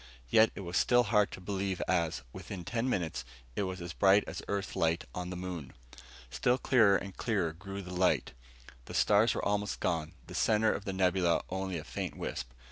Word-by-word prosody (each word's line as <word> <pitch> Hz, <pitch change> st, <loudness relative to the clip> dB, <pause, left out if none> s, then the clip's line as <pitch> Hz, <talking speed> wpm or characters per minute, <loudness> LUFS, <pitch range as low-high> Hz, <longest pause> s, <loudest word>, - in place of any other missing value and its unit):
And -, -, -22 dB
yet 110 Hz, +1 st, +6 dB
it -, -, -6 dB
was 90 Hz, -1 st, -2 dB
still 120 Hz, 0 st, +4 dB
hard 105 Hz, -4 st, +3 dB
to -, -, -8 dB
believe 95 Hz, 0 st, -2 dB
as, 85 Hz, -3 st, 0 dB
within 95 Hz, -1 st, -7 dB
ten 120 Hz, +5 st, -1 dB
minutes, 85 Hz, -, -1 dB, 0.3 s
it -, -, 0 dB
was 95 Hz, 0 st, -5 dB
as 85 Hz, -1 st, -5 dB
bright 100 Hz, +1 st, +5 dB
as -, -, -6 dB
Earth 100 Hz, -1 st, -2 dB
light 85 Hz, 0 st, +1 dB
on 90 Hz, 0 st, -4 dB
the 90 Hz, -, -5 dB
moon. 90 Hz, -6 st, -6 dB, 0.6 s
Still 125 Hz, -, +2 dB
clearer 110 Hz, -7 st, +5 dB
and 100 Hz, -1 st, -7 dB
clearer 100 Hz, -9 st, 0 dB
grew 100 Hz, +3 st, -7 dB
the 90 Hz, 0 st, -8 dB
light. 90 Hz, -7 st, +2 dB, 0.5 s
The -, -, -8 dB
stars 105 Hz, +2 st, +4 dB
were -, -, -2 dB
almost 105 Hz, 0 st, 0 dB
gone, 80 Hz, -2 st, -1 dB
the -, -, -10 dB
center 110 Hz, 0 st, +3 dB
of 100 Hz, -, -5 dB
the 95 Hz, -, -2 dB
nebula 90 Hz, -2 st, +2 dB
only 95 Hz, -1 st, -2 dB
a 75 Hz, -, -6 dB
faint -, -, -5 dB
wisp. -, -, -4 dB
95 Hz, 205 wpm, -31 LUFS, 90-105 Hz, 0.6 s, yet